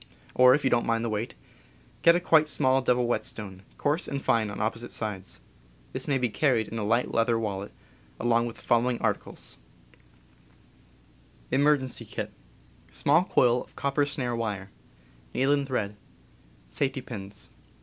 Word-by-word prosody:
Or, 125 0 +7
if 150 - -2
you 135 - +2
don't 120 -1 +2
mind 115 0 +1
the 115 - -2
weight, 105 - -3 0.7
get 170 0 +6
a - - +3
quite 160 -3 +4
small 130 -2 +3
double 125 -1 +2
whetstone, 105 -5 -3 0.2
coarse 150 +4 0
and 140 - -2
fine 115 -5 +1
on 100 - -6
opposite 115 +2 -2
sides. 100 -4 -5 0.5
This - - -4
may 140 - +2
be 125 -1 +1
carried 120 -1 +1
in 115 - -4
a - - -2
light 115 +4 +1
leather 115 0 +2
wallet, 100 -3 -3 0.5
along 120 0 +2
with 115 - -7
the - - -14
following 120 +1 +2
articles: - - -3 1.9
Small 145 +3 -1
coil 125 -8 +3
of - - -23
copper 140 +1 0
snare 125 -4 -2
wire. 105 -4 -3 0.6
Needle 135 +2 +3
and 140 -1 0
thread. 105 -6 -2 0.7
Safety 135 - -2
pins. 100 -5 -9
120 Hz, 150 wpm, -27 LUFS, 110-135 Hz, 1.9 s, Or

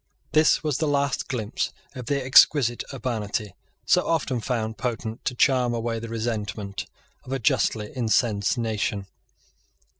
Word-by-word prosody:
This 155 0 +4
was 150 -4 0
the 160 - +1
last 140 -1 0
glimpse 115 -3 -2 0.2
of 125 -3 -8
the 140 +1 +1
exquisite 130 -2 +5
urbanity, 110 -6 -3 0.3
so - - +4
often 145 -6 0
found 110 -3 -2
potent 115 -1 -3
to 125 - -1
charm 125 -2 +3
away 115 0 -2
the 115 0 -7
resentment 105 -3 -3 0.4
of 125 - -10
a 135 - 0
justly 105 -2 0
incensed 110 -3 +1
nation. 110 -3 -1
120 Hz, 140 wpm, -25 LUFS, 110-130 Hz, 0.4 s, exquisite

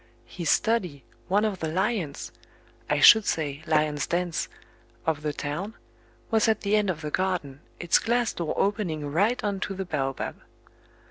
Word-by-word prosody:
His 170 -4 -4
study, 180 - +1 0.2
one 205 +3 +2
of 200 -4 -2
the 160 - -2
lions 185 -3 -2 0.6
I - - +1
should 220 -1 +9
say, 150 -6 -2
lions' 150 -2 +1
dens 175 -2 -1 0.6
of 160 -2 0
the 150 0 -1
town, 150 +10 -4 0.6
was 220 -1 +3
at 220 -1 +2
the 205 +1 +1
end 210 -2 +2
of 165 -3 -2
the 150 -1 -4
garden, 175 -8 -1 0.2
its 175 -1 +3
glass 235 0 0
door 170 -3 -3
opening 190 -7 0
right 200 +12 +1
on 200 -2 -1
to 195 - -3
the 190 0 -4
baobab. 135 -5 -3
180 Hz, 160 wpm, -26 LUFS, 150-205 Hz, 0.6 s, should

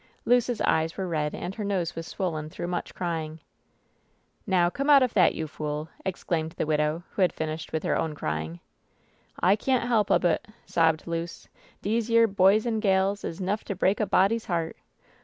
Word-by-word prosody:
Luce's 245 -1 +2
eyes 160 +1 +1
were 190 -1 -2
red, 150 -3 -1
and 185 - -5
her 210 - -5
nose 190 -5 -1
was 165 0 -6
swollen 155 -5 -3
through 155 - -6
much 175 0 -4
crying. 160 -3 -3 1.1
"Now, 180 -3 +3
come 275 +11 -2
out 280 -2 +8
of 250 - 0
that, 190 - +4
you 160 - -3
fool!" 150 0 -4
exclaimed 165 -3 -2
the - - -2
widow, 150 +2 0
who - - -3
had 180 - +4
finished 155 0 -5
with 160 -1 -2
her - - +1
6wn 160 -2 -1
crying. 80 - -4 0.8
^ - - +4
'T[ 205 - +1
can't 255 -3 +1
help 220 -4 +2
ob - - +3
it 165 -2 +1
!" - - -34
sobbed 160 -2 +2
Luce. 170 0 -5 0.4
"Dese 225 +3 0
yere 230 0 +6
boys 200 +1 +4
an' 225 -2 0
gals 195 -1 +1
is 165 - -5
'nough 195 +3 -1
to 200 - -3
break 190 +2 +1
a 215 - +1
body's 200 +5 +2
heart 165 -3 -2
180 Hz, 195 wpm, -27 LUFS, 160-205 Hz, 1.1 s, out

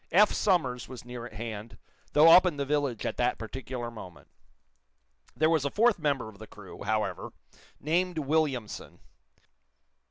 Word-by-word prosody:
Eph 205 +5 +5
Somers 145 - 0
was 125 -2 -9
near 120 -1 -7
at 115 - -16
hand, 110 0 -7 0.4
though 155 +2 +7
up 185 +2 +8
in 160 -5 -2
the 140 - -1
village 140 -5 -1
at - - -3
that 125 0 +1
particular 120 +1 -6
moment. 95 -6 -12 1.1
There 155 - +3
was 160 -3 +2
a 140 - 0
fourth 225 - +3
member 140 -7 0
of 105 -2 -13
the 110 - -10
crew, 100 -3 -12
however, 105 -3 -2 0.5
named 175 +3 0
Williamson. 145 -6 -2
130 Hz, 155 wpm, -28 LUFS, 110-155 Hz, 1.1 s, up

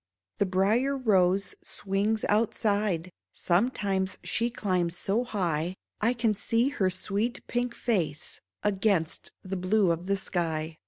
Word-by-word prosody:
The 200 - +3
Brier 215 +9 +2
Rose 195 -5 +2
swings 205 +3 -1
outside; 205 -4 +1 0.2
Sometimes 190 -1 0
she 235 +1 0
climbs 180 -6 -1
so 205 +7 +1
high 180 -7 -1 0.2
I 230 +3 +2
can 230 -2 +2
see 230 +5 +1
her 200 -10 +1
sweet 200 +6 -1
pink 245 0 -1
face 175 -9 -1 0.2
Against 195 -5 +1
the 190 0 -4
blue 185 +1 +3
of 170 +2 -3
the 200 0 +2
sky. 160 -4 -2
195 Hz, 125 wpm, -28 LUFS, 180-220 Hz, 0.2 s, The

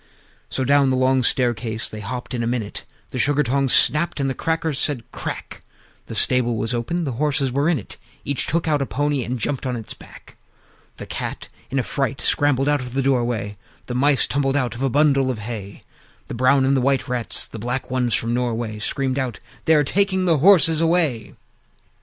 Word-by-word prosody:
III. - - -32
So 130 - -1
down 140 0 +4
the 130 - +1
long 130 0 +3
staircase 115 -3 0
they 110 - -6
hopped 125 +6 -6
in 120 - -2
a 115 - -1
minute; 115 -4 -3 0.3
The 130 - -3
Sugar 145 +3 +3
tongs 135 +1 +1
snapped, 150 +1 +4
and 140 - 0
the 135 - -1
Crackers 160 -1 -2
said 140 -6 -1
"Crack!" - - -6 0.5
The - - -7
stable 120 -2 +2
was 115 +2 -2
open; 125 +9 -2
the 140 - -2
horses 140 -3 +1
were 140 +5 +1
in 170 - +2
it: 105 - -8 0.3
Each 140 -2 -2
took 165 0 -1
out 150 -2 +1
a 135 - -1
pony, 145 -1 -1
and 125 +2 -3
jumped 130 +5 -2
on 130 -2 -2
his 110 -3 -6
back. - - -16 0.6
The - - -7
Cat - - -6 0.2
in 135 - -2
a 130 - +1
fright 135 +2 -2
scrambled 145 -1 +2
out 145 -1 +2
of 125 0 -8
the 135 - +1
doorway; 120 -6 0 0.3
The 125 - -5
Mice 140 +2 +3
tumbled 135 -1 0
out 125 -5 0
of 120 - -8
a 135 - +1
bundle 140 -1 +3
of 125 - -2
hay; 105 -2 -7 0.4
The - - -8
brown 130 +3 +3
and 135 +1 +3
white 135 +1 +1
Rats, 125 -3 +1
and - - -11
the 115 - -7
black 125 +4 -4
ones 125 -3 +1
from 115 +1 0
Norway, 115 -3 -2
Screamed 135 +3 -1
out, 125 -4 -3 0.3
"They 160 - +5
are 150 - +4
taking 190 +4 +1
the 165 -4 +3
horses 165 -2 +5
away!" 160 -10 0
130 Hz, 210 wpm, -21 LUFS, 120-145 Hz, 0.6 s, They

